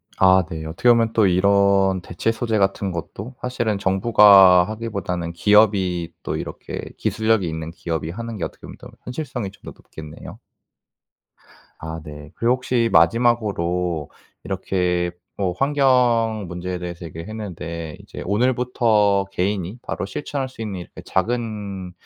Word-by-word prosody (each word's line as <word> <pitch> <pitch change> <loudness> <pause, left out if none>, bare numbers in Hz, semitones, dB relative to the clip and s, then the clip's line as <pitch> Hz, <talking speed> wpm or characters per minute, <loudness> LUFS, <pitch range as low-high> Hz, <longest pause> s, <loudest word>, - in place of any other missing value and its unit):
아 95 0 +5
네 80 -2 -6
어떻게 85 +10 +1
보면 115 -1 +4
또 110 -3 +4
이런 95 0 +3
대체 85 +6 -2
소재 115 -1 -1
같은 100 -1 0
것도 100 +8 -7
사실은 120 -4 -1
정부가 95 -2 +6
하기보다는 100 -6 -4
기업이 95 -3 +3
또 - - -3
이렇게 - - -6 0.2
기술력이 110 -4 +1
있는 80 0 -4
기업이 80 -2 -4
하는 115 +5 -6
게 - - -4
어떻게 - - -6
보면 - - -10 0.3
현실성이 125 -6 -5
좀 100 - -22
더 - - -5
높겠네요. 75 -1 -11 1.4
아 80 +1 -6
네. 75 0 -10
그리고 120 +2 +2
혹시 125 -2 0
마지막으로 90 - +2 0.3
이렇게 90 -2 -1 0.3
뭐 95 -3 -1
환경 125 -6 +2
문제에 90 +1 -4
대해서 85 0 -7
얘기를 80 +1 -8
했는데 85 -7 -6
이제 - - -9
오늘부터 110 -3 +2
개인이 95 +3 -2
바로 - - -4
실천할 135 +6 -4
수 130 - -14
있는 100 -4 -5
이렇게 85 - -11
작은 100 -3 -3
100 Hz, 315 characters per minute, -22 LUFS, 90-115 Hz, 1.4 s, 정부가